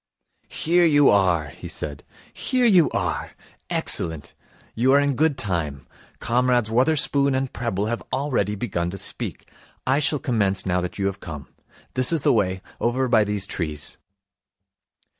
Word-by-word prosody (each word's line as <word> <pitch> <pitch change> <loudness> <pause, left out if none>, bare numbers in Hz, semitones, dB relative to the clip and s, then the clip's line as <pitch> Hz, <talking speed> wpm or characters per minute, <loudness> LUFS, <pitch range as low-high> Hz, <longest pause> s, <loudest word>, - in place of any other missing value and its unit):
'Here 175 +2 +2
you 145 -4 +5
are,' 90 -7 +2
he - - -10
said. 75 -2 -7 0.3
'Here 255 -2 0
you 185 -8 +5
are. 90 -4 -3 0.4
Excellent. 80 -3 0 0.4
You 130 +4 +3
are 140 - +6
in 145 0 +1
good 150 0 +2
time. 80 - -2 0.3
Comrades 120 -2 +1
Wotherspoon 140 +2 +3
and 130 0 -2
Prebble 105 -4 -2
have 115 +2 -2
already 130 -7 0
begun 85 -5 -2
to 95 - -6
speak. - - -6 0.4
I 130 +2 +2
shall 150 +1 0
commence 110 -9 0
now 90 -1 +1
that 90 - -5
you 100 - -1
have 100 0 -2
come. 75 -6 -8 0.4
This 130 +2 +2
is 160 -4 0
the 145 - +4
way. 95 -4 0 0.2
Over 130 +2 0
by 115 -3 +4
these 105 -1 -2
trees.' 75 -6 -5
115 Hz, 155 wpm, -23 LUFS, 95-135 Hz, 0.4 s, are